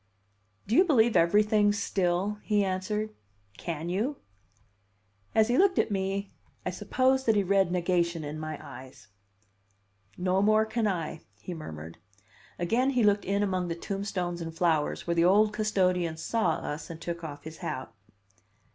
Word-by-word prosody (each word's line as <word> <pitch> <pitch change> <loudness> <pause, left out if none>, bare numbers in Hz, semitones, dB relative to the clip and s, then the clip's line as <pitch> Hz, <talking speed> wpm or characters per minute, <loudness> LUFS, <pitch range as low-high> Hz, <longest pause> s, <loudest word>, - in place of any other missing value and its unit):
"Do 220 - 0
you 365 - +7
believe 240 -10 +3
everything 205 +4 +4
still?" 200 0 0
he 205 -2 +1
answered. 200 +3 -2 0.5
"Can 165 +3 -4
you?" 215 +11 -1 1.2
As 220 -1 +5
he 245 +2 +2
looked 380 -1 +4
at - - +2
me, 195 0 -2 0.3
I 185 - -1
suppose 255 +7 +1
that 225 - +4
he 205 - +3
read 195 -1 +2
negation 175 -2 0
in 150 +1 -5
my 155 0 -5
eyes. 130 -3 -12 1.1
"No 185 +1 +1
more 215 +1 +4
can 220 0 -1
I," 165 -5 -3 0.2
he 180 - -6
murmured. 80 - -8 0.6
Again 230 +10 +1
he 250 -4 +2
looked 205 -1 +3
in 200 +1 +1
among 185 -3 -1
the 165 - -3
tombstones 180 -2 -3
and 165 0 -6
flowers, 160 -4 +1
where 170 - 0
the 170 0 +3
old 210 +3 +4
custodian 185 -6 +1
saw 225 +7 0
us 150 +1 -5
and 165 -1 -7
took 170 0 -5
off 145 -2 -7
his 160 0 -9
hat. 130 -3 -5
190 Hz, 155 wpm, -28 LUFS, 170-210 Hz, 1.2 s, you